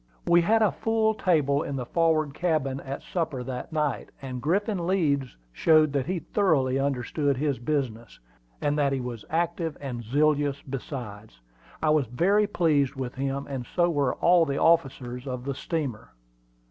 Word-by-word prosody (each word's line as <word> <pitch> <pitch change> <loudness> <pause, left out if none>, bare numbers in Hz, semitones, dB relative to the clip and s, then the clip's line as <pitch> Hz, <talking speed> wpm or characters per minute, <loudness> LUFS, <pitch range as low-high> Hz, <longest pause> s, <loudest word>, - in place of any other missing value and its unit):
We 175 0 +5
had 220 +6 +3
a 210 - +3
full 220 -1 +1
table 150 -8 +2
in 140 - -4
the 125 -2 -3
forward 155 -1 +1
cabin 155 -6 0
at 135 0 -6
supper 160 -8 -3
that 125 +4 -6
night, 150 -4 -1
and 130 -2 -6
Griffin 185 - 0
Leeds 140 - 0 0.2
showed 155 - +4
that 140 -1 0
he 185 +1 -1
thoroughly 155 -7 +1
understood 140 +1 0
his 145 -1 -1
business, 120 -4 -3 0.4
and 145 +1 0
that 140 -1 +2
he 135 - -1
was 125 -3 -6
active 165 -1 -1
and 125 -4 -5
zealous 145 +3 +1
besides. 120 - -7 0.4
I 155 - +4
was 150 -5 +2
very 190 - +2
well 205 - -10
pleased 145 -5 +2
with 130 -2 -4
him, 135 +1 -3
and 135 -3 -5
so 175 -1 +3
were 140 -5 +1
all 175 0 +4
the 140 -3 -1
other - - +5
officers 125 -1 -8
of 125 -1 -5
the 140 - -2
steamer. 140 -5 -4
145 Hz, 170 wpm, -26 LUFS, 130-165 Hz, 0.4 s, We